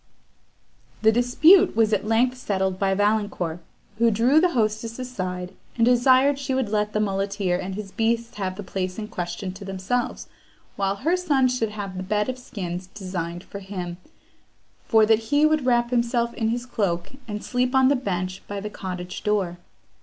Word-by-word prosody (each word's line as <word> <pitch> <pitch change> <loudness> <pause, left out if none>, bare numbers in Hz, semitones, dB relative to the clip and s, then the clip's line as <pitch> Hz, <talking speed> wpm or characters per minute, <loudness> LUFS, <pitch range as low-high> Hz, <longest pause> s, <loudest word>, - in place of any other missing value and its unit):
The 220 - +6
dispute 310 - +5
was 220 -1 +3
at 210 +1 0
length 240 +3 +2
settled 190 -6 -1
by 195 -1 +2
Valancourt, 205 -5 0 0.4
who 235 0 +5
drew 235 +7 +4
the 360 -1 +2
hostess 225 0 -1
aside, 185 -8 -5 0.2
and 230 - +4
desired 255 +3 +4
she 270 -1 -2
would 260 -5 0
let 210 0 0
the 215 - +1
muleteer 195 -2 0
and 190 +1 -4
his 205 -2 -6
beasts 230 +1 -1
have 190 -2 -2
the 205 - -7
place 185 0 -3
in 215 -1 -5
question 180 +1 -4
to 195 +2 -10
themselves, 195 +6 -2 0.5
while 195 0 0
her 315 - +1
sons 275 -8 +2
should 225 -3 0
have 200 -3 -6
the - - -3
bed 210 +4 0
of 255 0 -4
skins 180 -6 -6
designed 180 -3 -5
for 200 - -8
him, 185 -3 -6 0.9
for 220 -1 +5
that 220 0 +4
he 290 +1 +4
would 310 -4 +2
wrap 240 -1 +2
himself 235 -1 +1
in 225 -1 -1
his 240 +2 -2
cloak, 195 -7 -2 0.2
and 210 -1 -5
sleep 250 +1 0
on 265 0 +5
the 285 - +4
bench 185 -6 -3
by 205 0 -4
the 210 +1 -6
cottage 180 -3 -6
door. 195 -5 0
210 Hz, 180 wpm, -24 LUFS, 190-245 Hz, 0.9 s, The